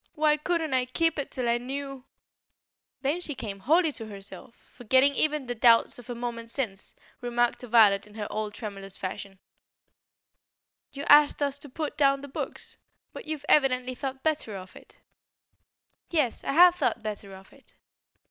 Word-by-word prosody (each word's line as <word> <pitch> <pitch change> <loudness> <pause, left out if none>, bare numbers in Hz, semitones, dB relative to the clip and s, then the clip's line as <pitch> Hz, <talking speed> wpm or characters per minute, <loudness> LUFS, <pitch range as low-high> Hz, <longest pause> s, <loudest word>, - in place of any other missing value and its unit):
Why 300 0 +3
couldn't 320 -1 -1
I 255 -1 +2
keep 320 +5 0
it 280 - -3
till 250 -2 -3
I 235 0 +2
knew 270 +1 -6 0.5
" - - -63
Then 295 +6 0
she 300 -5 -3
came 200 -5 -6
wholly 315 - +3
to 225 -5 -7
herself 205 +4 -9
and, - - -30
forgetting 260 +4 +4
even 300 -1 0
the 245 - -3
doubts 230 +1 +4
of 245 - -14
a 245 - -4
moment 235 -1 -5
since, 230 -6 -3 0.3
remarked 240 0 0
to 250 - -9
Violet 210 -4 +5
in 210 - -17
her 215 -2 -4
old 215 -1 -4
tremulous 195 -3 -7
fashion: 195 +1 -6 1.5
"You 280 - -7
asked 295 0 +6
us 280 0 -1
to 290 - -11
pull 305 +3 -3
down 275 -1 +3
the 285 - -8
books? 275 - -6 0.3
But - - -9
you've 305 -2 -5
evidently 255 -3 +3
thought 265 +1 -6
better 305 -9 -1
of 185 -1 -10
it." - - -16 1.1
"Yes, 300 -9 0
I - - -2
have 350 +3 +8
thought 250 -9 -1
better 205 -2 -6
of 190 0 -16
it." - - -21
255 Hz, 175 wpm, -27 LUFS, 220-290 Hz, 1.5 s, have